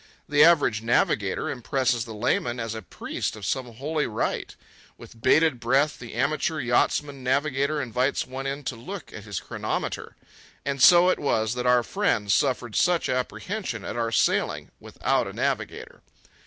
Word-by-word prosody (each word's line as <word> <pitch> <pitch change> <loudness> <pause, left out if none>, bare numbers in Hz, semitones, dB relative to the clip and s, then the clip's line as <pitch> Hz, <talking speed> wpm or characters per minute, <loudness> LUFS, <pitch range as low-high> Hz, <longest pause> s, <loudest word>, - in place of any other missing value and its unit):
The 145 0 +5
average 145 -10 +4
navigator 105 -4 +1
impresses 125 -2 0
the 115 - -8
layman 120 +2 0
as 115 -1 -3
a 110 - -6
priest 90 - -4
of 105 -3 -8
some 125 +2 -2
holy 150 +6 -2
rite. 110 - -3 0.4
With 115 - -14
bated 150 +1 +4
breath, 135 +5 +1
the 120 -3 -9
amateur 155 +5 0
yachtsman 135 +2 0
navigator 140 +2 +1
invites 130 +1 0
one 135 +1 -5
in 140 +1 -4
to 130 - -3
look 180 +12 -8
at 105 - -9
his 100 -4 -4
chronometer. - - -4 0.5
And 140 -1 -2
so 175 +3 +8
it - - +1
was 110 -6 0
that 125 0 -2
our 125 -1 +4
friends 115 - 0
suffered 125 -5 0
such 175 -1 +2
apprehension 130 - -3
at - - -5
our 115 -1 -1
sailing 115 - +1
without - - -1
a - - -7
navigator. - - -3
130 Hz, 160 wpm, -25 LUFS, 115-145 Hz, 0.5 s, so